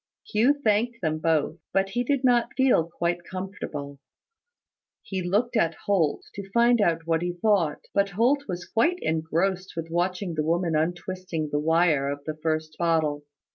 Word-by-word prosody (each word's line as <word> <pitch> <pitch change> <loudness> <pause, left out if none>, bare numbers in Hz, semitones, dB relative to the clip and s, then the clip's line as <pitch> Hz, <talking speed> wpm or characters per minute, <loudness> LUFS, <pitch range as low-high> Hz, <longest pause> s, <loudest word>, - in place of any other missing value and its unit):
Hugh 250 +7 +3
thanked 230 +2 +1
them 155 -1 0
both; 160 0 0
but 195 0 +2
he 240 +5 -1
did 275 +1 0
not 245 -2 +2
feel 250 -11 +3
quite 170 +1 -2
comfortable. 170 -7 -6 1.0
He 190 -2 -3
looked 205 +8 0
at 165 -7 +2
Holt, 180 -7 +1
to 200 -1 -8
find 235 +2 +4
out 165 -4 +1
what 165 0 +1
he 175 0 -2
thought: 175 -4 +1
but 200 0 +2
Holt 250 +9 +2
was 175 0 -4
quite 335 +11 +1
engrossed 170 +4 -1
with 165 0 -5
watching 180 +1 -1
the 155 -1 -1
woman 165 +1 0
untwisting 175 0 -2
the 145 - +1
wire 160 -3 +2
of 145 0 -5
the 155 - -3
first 155 0 -2
bottle. 160 -4 +1
175 Hz, 165 wpm, -26 LUFS, 160-205 Hz, 1.0 s, find